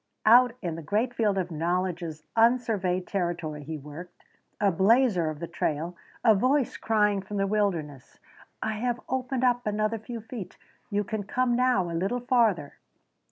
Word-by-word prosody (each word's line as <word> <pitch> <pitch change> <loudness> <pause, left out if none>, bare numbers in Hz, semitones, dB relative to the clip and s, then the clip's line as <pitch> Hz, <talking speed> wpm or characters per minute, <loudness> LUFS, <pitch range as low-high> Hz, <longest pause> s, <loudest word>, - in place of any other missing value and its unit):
Out 245 +2 +7
in 170 -2 -2
the 165 - -6
great 215 - 0
field 210 -4 +1
of 180 -2 -2
knowledge's 170 -1 -2
unsurveyed 225 -6 +2
territory 170 -5 -3
he 160 +2 -5
worked 150 +5 -11 0.4
a 200 -1 +3
blazer 195 -2 +3
of 155 - -5
the 170 - -5
trail, 165 0 -2 0.3
a 225 - +8
voice 255 +6 +1
crying 210 -2 +1
from 205 +2 -6
the 195 - +1
wilderness: 175 -10 -2 0.5
"I 220 -1 -2
have 245 +1 -1
opened 260 0 -2
up 245 -2 +2
another 215 +1 0
few 230 +2 -7
feet. 225 -3 -8 0.3
You 205 0 0
can 215 +1 -3
come 240 +4 0
now 250 -5 +3
a 170 -1 -5
little 195 +9 -1
farther." 230 - +1
205 Hz, 160 wpm, -27 LUFS, 175-235 Hz, 0.5 s, a